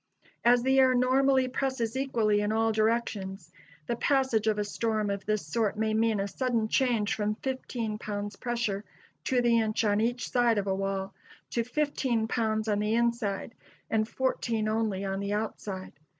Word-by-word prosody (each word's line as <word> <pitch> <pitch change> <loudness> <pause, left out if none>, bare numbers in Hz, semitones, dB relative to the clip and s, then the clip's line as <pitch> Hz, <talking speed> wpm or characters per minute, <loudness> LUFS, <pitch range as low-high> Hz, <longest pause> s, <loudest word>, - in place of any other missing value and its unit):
As 240 0 +5
the 265 +1 +4
air 260 -1 +5
normally 260 +1 +3
presses 255 -3 -2
equally 230 -6 +1
in 210 0 0
all 225 +1 +2
directions, 215 -5 -1 0.3
the 235 - -1
passage 260 -4 +1
of 215 -1 +2
a 210 - +1
storm 215 0 -1
of 200 0 -5
this 215 -5 0
sort 215 +6 0
may 220 0 0
mean 220 -1 +2
a 195 - -1
sudden 235 0 0
change 235 -6 +2
from 210 0 -1
fifteen 240 -4 -4
pounds 205 -1 -4
pressure 235 -5 -2 0.4
to 250 -2 +2
the 235 -1 +4
inch 220 0 0
on 205 0 +2
each 240 +2 -1
side 240 -3 +3
of 200 - 0
a 195 - 0
wall, 195 0 -2 0.4
to 235 - 0
fifteen 250 -3 0
pounds 220 -2 0
on 205 -1 +1
the 210 +1 +1
inside 235 -3 0 0.4
and 215 -1 +2
fourteen 235 -4 -1
only 215 -3 -1
on 195 0 -2
the 200 +1 -2
outside. 205 -3 -4
220 Hz, 175 wpm, -29 LUFS, 210-240 Hz, 0.4 s, As